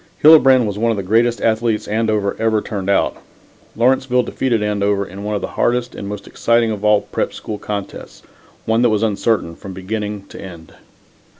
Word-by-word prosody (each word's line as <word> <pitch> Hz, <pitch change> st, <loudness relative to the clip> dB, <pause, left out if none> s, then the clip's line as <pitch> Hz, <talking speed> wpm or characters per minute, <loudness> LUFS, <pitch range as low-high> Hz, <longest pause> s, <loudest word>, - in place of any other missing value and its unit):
Hillebrand 135 Hz, -5 st, +7 dB
was 105 Hz, -1 st, -4 dB
one 115 Hz, +1 st, +1 dB
of 115 Hz, -, 0 dB
the 100 Hz, -, -3 dB
greatest 115 Hz, +5 st, +2 dB
athletes 110 Hz, -1 st, 0 dB
Andover 110 Hz, -2 st, 0 dB
ever 110 Hz, -1 st, +2 dB
turned 100 Hz, -2 st, -5 dB
out. 100 Hz, -, +2 dB, 0.6 s
Lawrenceville 125 Hz, +1 st, +2 dB
defeated 120 Hz, -5 st, -1 dB
Andover 100 Hz, -1 st, 0 dB
in 95 Hz, +2 st, -9 dB
one 105 Hz, 0 st, -2 dB
of 100 Hz, -, -2 dB
the -, -, -4 dB
hardest 120 Hz, 0 st, +1 dB
and 100 Hz, -, -7 dB
most 105 Hz, 0 st, -6 dB
exciting 115 Hz, -1 st, +1 dB
of 105 Hz, -1 st, -5 dB
all 105 Hz, -1 st, +4 dB
Prep. 100 Hz, -, -3 dB
School 105 Hz, -1 st, -6 dB
contests, 100 Hz, -2 st, -7 dB, 0.4 s
one 110 Hz, +1 st, +2 dB
that 120 Hz, -, +4 dB
was 110 Hz, 0 st, +1 dB
uncertain 105 Hz, -5 st, 0 dB
from 95 Hz, +2 st, -9 dB
beginning 105 Hz, +1 st, -5 dB
to -, -, -10 dB
end. 85 Hz, -4 st, -11 dB
105 Hz, 185 wpm, -18 LUFS, 100-115 Hz, 0.6 s, Hillebrand